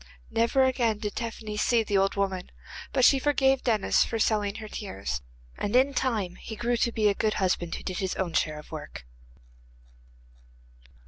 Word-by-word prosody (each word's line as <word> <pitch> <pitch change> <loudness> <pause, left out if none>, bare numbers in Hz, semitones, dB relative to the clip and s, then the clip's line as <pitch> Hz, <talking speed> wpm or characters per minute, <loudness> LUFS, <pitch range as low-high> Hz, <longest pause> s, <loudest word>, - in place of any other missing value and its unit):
Never 230 +4 +3
again 245 -4 +1
did 210 -1 -4
Tephany 220 -2 -5
see 230 +1 +3
the 205 -2 +1
old 195 0 +1
woman, 195 -2 -2 0.4
but 260 -2 +4
she 275 - +6
forgave 270 -1 +2
Denis 220 -5 +3
for 230 - -3
selling 210 -2 +1
her 215 - -7
tears, 100 - -5 0.4
and 205 - -1
in 265 +2 +4
time 215 -9 -1
he 220 - -8
grew 240 +2 0
to 235 - +1
be 215 -2 +2
a 205 - +4
good 215 +1 0
husband, 180 -3 0
who - - -8
did 185 - -3
his 190 -1 -2
own 180 -3 -2
share 155 -1 0
of 150 - -12
work. 150 - -8
215 Hz, 180 wpm, -27 LUFS, 190-240 Hz, 0.4 s, she